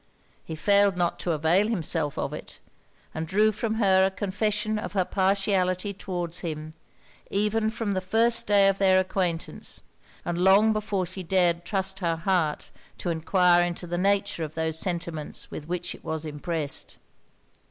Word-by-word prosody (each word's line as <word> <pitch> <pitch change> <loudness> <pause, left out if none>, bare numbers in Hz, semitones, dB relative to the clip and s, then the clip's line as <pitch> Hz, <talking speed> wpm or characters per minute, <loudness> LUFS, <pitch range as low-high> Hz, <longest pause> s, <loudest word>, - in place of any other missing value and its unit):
He 160 - -6
failed 200 +2 +3
not 175 -1 0
to 175 - -1
avail 165 +6 +2
himself 165 -8 -1
of - - -2
it; - - -9 0.6
and 160 +1 -4
drew 210 +5 +3
from 220 +1 -2
her 190 -4 +4
a 190 - +3
confession 210 +2 -1
of 215 - -6
her 190 -3 +1
partiality 195 0 +1
towards 175 -3 -4
him, 155 -2 -5 0.6
even 210 +2 +1
from 220 -2 -3
the 185 - -1
first 225 +5 +3
day 200 -1 +5
of 195 0 +1
their 190 -1 +5
acquaintance; 180 -3 -2 0.4
and 175 0 -2
long 195 +4 +5
before 205 -3 -1
she 185 +2 -7
dared 175 -1 +1
trust 195 -1 -2
her 170 -3 0
heart 165 -2 -1 0.3
to 175 - -4
enquire 175 +2 +3
into 175 0 -3
the 175 0 -3
nature 200 -3 +1
of 155 0 -6
those 160 0 -2
sentiments 170 -4 -4
with 150 - -7
which 175 0 -3
it - - -14
was 160 0 -3
impressed. 150 -1 -3
185 Hz, 165 wpm, -26 LUFS, 170-200 Hz, 0.6 s, day